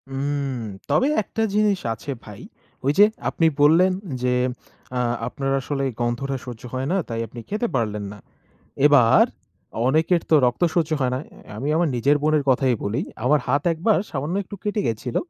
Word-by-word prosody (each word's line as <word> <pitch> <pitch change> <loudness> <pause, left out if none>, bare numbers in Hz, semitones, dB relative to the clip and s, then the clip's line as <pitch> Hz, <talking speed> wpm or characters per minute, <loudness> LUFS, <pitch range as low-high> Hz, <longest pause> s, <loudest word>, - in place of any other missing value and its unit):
উম 140 -1 -2 0.3
তবে 260 - +3
একটা 225 - -5
জিনিস 210 -2 +2
আছে 125 +6 -7
ভাই। 105 -2 -11 0.4
ওই 140 - +4
যে 205 - +9 0.2
আপনি 165 - 0 0.2
বললেন 165 +6 +5 0.3
যে 125 0 +2 0.6
আ - - +1 0.3
আপনার 135 -1 -3
আসলে 140 0 -3 0.2
গন্ধটা 120 +3 -1
সহ্য 120 -3 -8
হয়, 130 +1 -2
না 190 - +2
তাই 115 -1 -4
আপনি 120 +2 -10
খেতে 215 +3 -1
পারলেন 105 -4 -1
না। 105 - -13 0.7
এবার 135 -6 +6 0.6
অনেকের 160 +4 +2
তো 160 - +6
রক্ত 120 +6 -2
সহ্য 165 -3 +1
হয় 125 -1 +1
না, - - -1 0.3
অ্যা - - -11
আমি 140 - -3
আমার 170 0 +2
নিজের 140 +5 +3
বোনের 155 -1 +2
কথাই 130 -1 +3
বলি। 105 +4 -1 0.2
আমার 145 +3 +4
হাত 145 - +2
একবার 190 +7 +2
সামান্য 150 +4 -3
একটু 205 +2 -9
কেটে 210 0 0
গেছিল। 115 +2 -3
140 Hz, 175 wpm, -23 LUFS, 125-165 Hz, 0.7 s, যে